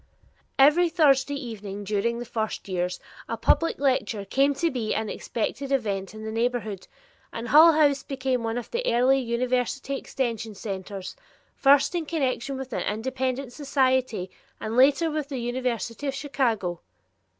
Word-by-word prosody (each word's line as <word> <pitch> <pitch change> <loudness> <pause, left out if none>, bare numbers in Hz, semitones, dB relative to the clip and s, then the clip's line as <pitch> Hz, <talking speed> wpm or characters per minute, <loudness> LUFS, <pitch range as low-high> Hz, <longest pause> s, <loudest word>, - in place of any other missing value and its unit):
Every 300 +6 +6
Thursday 285 -4 +3
evening 210 -6 -6
during 210 +3 0
the 240 - -5
first 220 -3 -3
years, 180 -1 -2 0.3
a - - -2
public 330 - +2
lecture 230 -7 0
came 275 +7 +2
to 335 +3 0
be 230 -4 -2
an 220 -1 -2
expected 270 +4 -3
event 205 -6 -1
in 215 - -8
the 220 - -4
neighborhood, 225 -4 -2 0.4
and 230 +1 -6
Hull 320 +3 +8
House 290 -3 +3
became 260 -2 -2
one 225 +1 -2
of 245 - -6
the 480 +1 -1
early 255 +3 +4
University 255 +2 -1
Extension 230 -5 -3
centers, 195 -1 -6 0.4
first 275 +4 +4
in 335 -3 -2
connection 275 -4 -1
with 265 -2 -7
an - - -1
independent 260 +3 -2
society 260 -9 0 0.3
and 220 +1 -4
later 285 +6 +4
with 300 -2 -3
the 275 - -4
University 245 +1 -3
of 275 - -2
Chicago. 230 - -1
255 Hz, 150 wpm, -26 LUFS, 220-275 Hz, 0.4 s, Hull